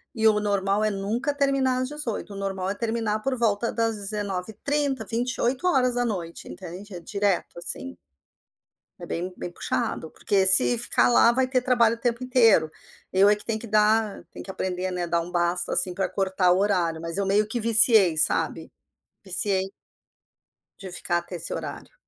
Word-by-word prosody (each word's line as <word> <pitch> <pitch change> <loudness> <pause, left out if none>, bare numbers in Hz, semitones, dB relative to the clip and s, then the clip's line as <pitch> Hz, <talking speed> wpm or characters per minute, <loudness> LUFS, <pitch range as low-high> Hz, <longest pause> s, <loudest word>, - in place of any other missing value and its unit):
E 220 - -1
o 215 -1 +4
normal 200 0 0
é 215 - +1
nunca 215 +8 -3
terminar 270 -2 0
às 255 - -3
18h. 250 -8 -4
O - - -9
normal 195 -1 -4
é 200 - -3
terminar 225 -1 -2
por 265 0 -2
volta 230 0 -1
das 225 -1 -1
19h30, 210 +8 -3
20h, 240 +2 -3
20h, 245 - -1
entende, 190 +3 -10
é 175 - -8
direto, 200 -2 -2
assim. 90 - -4 1.0
É - - -8
bem 180 +2 -5
bem 175 - -7
puxado. 160 -2 -4
Porque, 195 -2 0
se 190 +5 +7
ficar 240 - +1
lá, 235 -1 +5
vai 260 +1 0
ter 255 -1 0
trabalho 235 -2 +2
o - - -19
tempo 240 +1 -2
inteiro. 225 -10 +3 0.4
Eu 195 +2 +4
é 210 - +4
que 210 - -9
tenho 220 -1 -2
que 230 - -8
dar 215 -2 +1
tem - - -10
que 190 - -7
aprender, 185 0 -4
né, 180 -1 -3
a - - -1
dar 170 0 0
um 175 +2 -9
basta, 175 0 0
assim, 180 - +3
pra 190 +1 -2
cortar 190 -2 0
o 180 - +2
horário, 175 -5 0
mas 165 +2 -5
eu 200 - -1
meio 205 +2 +1
que 235 +2 -3
viciei, 220 -6 +6
sabe? - - +2 0.5
Viciei 190 +1 +1 1.2
de 190 -2 -9
ficar 175 0 -2
até 175 +1 -10
esse 170 -1 -2
horário. - - -8
205 Hz, 180 wpm, -24 LUFS, 185-235 Hz, 1.2 s, se